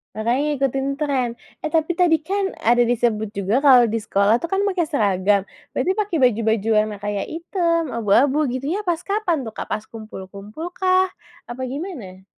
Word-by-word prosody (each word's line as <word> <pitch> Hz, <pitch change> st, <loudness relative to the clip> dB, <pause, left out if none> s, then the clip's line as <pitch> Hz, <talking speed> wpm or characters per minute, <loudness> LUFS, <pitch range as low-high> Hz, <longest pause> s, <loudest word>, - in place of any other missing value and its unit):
Makanya 230 Hz, +4 st, 0 dB, 0.2 s
ngikutin 270 Hz, 0 st, -1 dB
trend, 275 Hz, -5 st, -1 dB, 0.3 s
eh -, -, -3 dB
tapi 320 Hz, +1 st, +1 dB
tadi 345 Hz, -1 st, +3 dB
kan 390 Hz, +2 st, -2 dB
ada 240 Hz, +2 st, +4 dB
disebut 220 Hz, -3 st, 0 dB
juga 200 Hz, +5 st, +1 dB
kalau 265 Hz, -4 st, +7 dB
di 230 Hz, -1 st, 0 dB
sekolah 210 Hz, +1 st, +2 dB
tuh 335 Hz, -, -4 dB
kan 390 Hz, +3 st, 0 dB
pakai 370 Hz, -5 st, 0 dB
seragam, 200 Hz, -6 st, +2 dB, 0.3 s
berarti 370 Hz, -, +1 dB
pakai 400 Hz, -4 st, -1 dB
baju-baju 225 Hz, -3 st, +2 dB
warna 215 Hz, -1 st, +2 dB
kayak 205 Hz, -1 st, -2 dB
hitam, 335 Hz, -2 st, -1 dB
abu-abu 260 Hz, +7 st, +2 dB
gitunya 275 Hz, +9 st, -2 dB
pas 345 Hz, -1 st, 0 dB
kapan 395 Hz, -8 st, -1 dB
tuh, 220 Hz, -, -6 dB
Kak? -, -, -6 dB
Pas 215 Hz, -, -3 dB
kumpul-kumpulkah, 225 Hz, -, -2 dB, 0.4 s
apa 245 Hz, +2 st, -7 dB
gimana? 255 Hz, -, -7 dB
260 Hz, 160 wpm, -21 LUFS, 215-335 Hz, 0.4 s, kalau